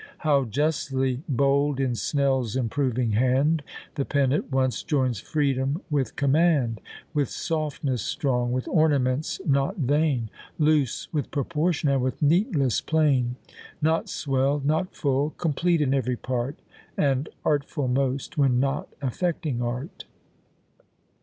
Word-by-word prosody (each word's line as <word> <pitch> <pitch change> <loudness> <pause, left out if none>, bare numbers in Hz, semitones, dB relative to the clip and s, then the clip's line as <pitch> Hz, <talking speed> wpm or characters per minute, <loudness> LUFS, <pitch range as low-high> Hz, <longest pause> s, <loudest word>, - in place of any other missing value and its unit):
How 145 -4 +2
justly 135 0 0
bold 140 +1 +2
in 130 -2 +1
SNELL'S 130 -2 0
improving 125 -1 0
hand 130 +8 +2 0.3
The 140 - -1
pen 140 -2 +1
at 150 - -2
once 130 -1 +1
joins 130 -7 0
freedom 140 - -1
with 140 -3 0
command! 140 - +2 0.3
With 145 -4 +1
softness 150 -6 -2
strong, 125 - -1
with 130 0 -2
ornaments 145 -3 +1
not 140 +6 +1
vain, 145 - +1 0.3
Loose 150 -5 +1
with 150 -3 -1
proportion, 155 +3 0
and 135 -2 +2
with 130 +1 -2
neatness 150 - +2
plain; 140 -6 +2 0.4
Not 160 +2 +1
swell'd, 140 0 0
not 160 +5 0
full, 140 +1 0
complete 170 +1 +1
in 135 -2 +2
every 125 -2 0
part, 130 +4 -3 0.3
And 140 0 +1 0.2
artful 145 -1 0
most, 135 +2 -1
when 130 -3 +3
not 135 +1 -1 0.2
affecting 145 -2 -1
art. 125 +6 -4
140 Hz, 125 wpm, -25 LUFS, 130-150 Hz, 0.4 s, when